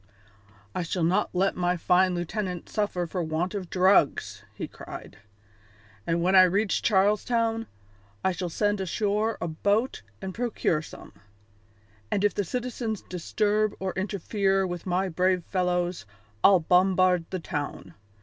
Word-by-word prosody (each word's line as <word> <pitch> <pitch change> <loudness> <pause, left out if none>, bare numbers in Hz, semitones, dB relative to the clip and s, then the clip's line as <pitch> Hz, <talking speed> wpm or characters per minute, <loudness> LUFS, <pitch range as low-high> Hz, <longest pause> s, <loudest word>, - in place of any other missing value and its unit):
"I 185 - -2
shall 170 +1 -2
not 185 +5 +2
let 190 +2 +1
my 180 0 0
fine 180 +2 +3
lieutenant 180 0 -3
suffer 205 -5 -1
for 175 +2 -3
want 165 +3 -2
of 190 -4 -5
drugs," 150 - +2
he 110 - -6
cried, - - -10 0.9
"and 170 0 +1
when 185 +2 +3
I 185 - +10
reach 195 +3 +2
Charles 205 0 +3
Town 230 -2 0 0.6
I 190 - +4
shall 180 0 -3
send 205 +3 0
ashore 210 +4 0
a - - -2
boat 205 +9 0 0.2
and 190 -1 -5
procure 220 -9 0
some; - - -12 1.0
and 200 - 0
if 205 - +3
the 205 - -1
citizens 235 0 -3
disturb 210 +4 0
or 190 -1 -3
interfere 195 0 0
with 175 0 -5
my 185 +2 +1
brave 180 +1 +1
fellows, 180 - -1 0.4
I'll 190 -3 +7
bombard 180 0 +3
the 185 - -3
town. 145 - -5
185 Hz, 145 wpm, -27 LUFS, 175-205 Hz, 1.0 s, I